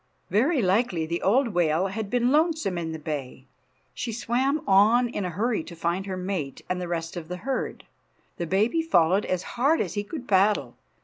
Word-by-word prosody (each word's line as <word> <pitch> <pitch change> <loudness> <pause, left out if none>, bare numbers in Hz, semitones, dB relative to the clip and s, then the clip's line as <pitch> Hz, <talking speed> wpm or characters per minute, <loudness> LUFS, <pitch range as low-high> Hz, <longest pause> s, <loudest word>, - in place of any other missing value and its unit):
Very 255 - +2
likely 185 -3 +1
the 170 +2 -3
old 240 +6 +3
whale 175 -2 +1
had 200 +2 -4
been 245 +1 +2
lonesome 310 - +2
in 165 -2 -3
the 160 - -4
bay. 145 -4 -6 0.5
She 230 - -4
swam 255 +6 0
on 220 +6 +5
in 205 -5 -3
a - - -2
hurry 210 +2 -1
to 170 - -10
find 170 +4 -2
her 190 -1 -3
mate 180 -7 -4
and 180 0 -2
the 180 - -3
rest 165 0 -3
of 170 -2 -6
the 180 +1 -5
herd. 265 +9 -4 0.5
The 170 - -3
baby 215 - +2
followed 190 - +3
as 185 0 -1 0.2
hard 305 +5 +4
as - - -2
he 205 - -2
could 255 +3 -7
paddle. 200 +2 +2
195 Hz, 195 wpm, -26 LUFS, 175-240 Hz, 0.5 s, on